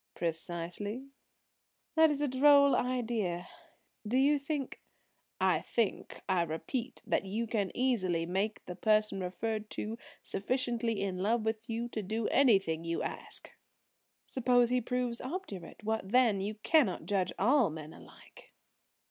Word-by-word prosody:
"Precisely." 175 +9 -3 0.8
"That 320 0 +6
is 290 -1 -1
a 295 - +2
droll 280 +1 +6
idea. 230 -9 -1 0.6
Do 245 +4 +1
you 285 +2 +4
think–" 280 -1 -4 0.6
"I - - +3
think, 230 -4 -2
I 185 -2 +2
repeat, 225 - -3
that - - +1
you 215 +5 -2
can 210 -4 -1
easily 185 -10 +1
make 195 +5 -2
the 180 - -6
person 215 +1 +2
referred 210 +4 -3
to 225 +2 -4 0.2
sufficiently 235 -1 -1
in 185 -2 -2
love 220 +3 +1
with 220 +1 -2
you 230 +1 -2
to 220 - -3
do 215 +3 -2
anything 195 - +3
you 170 0 -2
ask." - - -5 0.7
"Suppose 245 -1 +3
he 250 0 +2
proves 245 0 -2
obdurate? 255 - -6
What 220 -2 -2
then? 230 -4 +4
You 210 +2 -3
cannot 290 +6 +2
judge 190 -3 0
all 245 - +4
men 155 0 -8
alike." - - -16
220 Hz, 140 wpm, -32 LUFS, 190-250 Hz, 0.8 s, That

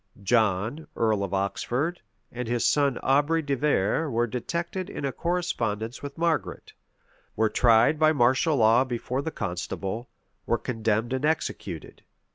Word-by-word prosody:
John, 110 +6 +1
earl 110 -3 +1
of 100 - -4
Oxford, 120 - -1 0.3
and 125 0 -5
his 120 0 0
son 140 -3 +2
Aubrey 145 +4 +2
de 140 -1 0
Vere 145 +1 +1
were 120 -1 +1
detected 170 - -4
in 140 - -5
a 135 - -1
correspondence 120 -11 -2
with 140 -1 -7
Margaret, 165 -1 -1 0.6
were 110 -1 +2
tried 120 +7 +4
by 155 0 +5
martial 135 +2 +3
law 115 +2 +5
before 125 +1 -3
the 160 - -3
constable, 95 - -4 0.4
were 115 - +2
condemned 115 0 -1
and 130 +1 -2
executed. 100 - -3
125 Hz, 140 wpm, -26 LUFS, 110-150 Hz, 0.6 s, by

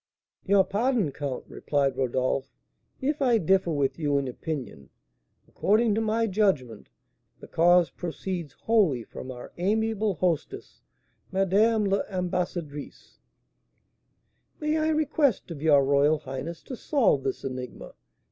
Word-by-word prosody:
"Your 200 0 +5
pardon, 215 - 0
count," 140 -2 -5
replied 140 -2 -1
Rodolph, 130 +1 -1 0.5
"if 290 +2 -1
I 245 -4 +4
differ 190 -1 +2
with 145 -1 0
you 145 -3 +1
in 140 -1 -1
opinion. 125 - -6 0.6
According 215 +2 +2
to 220 - 0
my 225 +1 +1
judgment, 185 - 0 0.5
the - - -11
cause 175 +1 +4
proceeds 175 -3 -5
wholly 190 - +3
from 130 - -9
our 125 -1 -9
amiable 215 +1 0
hostess, 170 -1 -2 0.5
Madame 205 +3 +3
l'Ambassadrice." 180 -6 -3 1.4
"May 305 0 0
I 310 0 +1
request 300 - +1
of 150 -4 -7
your 145 -3 +5
royal 145 +3 +3
highness 140 +3 -7
to 260 - -7
solve 240 - +2
this 135 -1 -3
enigma?" 130 -2 -6
175 Hz, 120 wpm, -27 LUFS, 140-215 Hz, 1.4 s, Your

